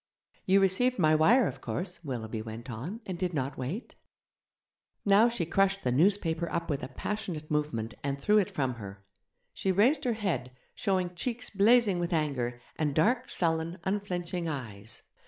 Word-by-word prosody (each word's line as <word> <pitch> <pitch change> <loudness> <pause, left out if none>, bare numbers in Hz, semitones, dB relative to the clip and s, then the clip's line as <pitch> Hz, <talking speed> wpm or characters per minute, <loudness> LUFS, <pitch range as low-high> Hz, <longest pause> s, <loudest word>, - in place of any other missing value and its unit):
'You 195 +1 +5
received 245 +7 +3
my 155 -4 +4
wire, 215 +12 +5
of - - -6
course,' 180 -1 -4
Willoughby 115 -6 -4
went 115 +3 -7
on, 160 - -6
'and 185 -3 -5
did 180 -2 -1
not 135 -1 -2
wait?' 150 - -4 1.1
Now 205 +4 +6
she 230 -8 -2
crushed 195 +3 +2
the 125 - +1
newspaper 170 +2 +2
up 170 - -2
with 145 - -1
a - - -4
passionate 180 -8 -4
movement, 120 -7 -1
and 140 0 -2
threw 210 +7 +4
it 195 - 0
from 130 -3 -1
her. 100 0 -9 0.5
She 190 - 0
raised 250 - +3
her 245 - +2
head, 190 - -2 0.2
showing 185 -2 0
cheeks 235 +7 -3
blazing 210 -1 +4
with 175 +1 -1
anger, 130 -6 -1 0.2
and 150 -3 0
dark, 240 +10 +2
sullen, 165 0 0
unflinching 180 -3 -2
eyes. 115 -7 -6
170 Hz, 165 wpm, -29 LUFS, 140-200 Hz, 1.1 s, Now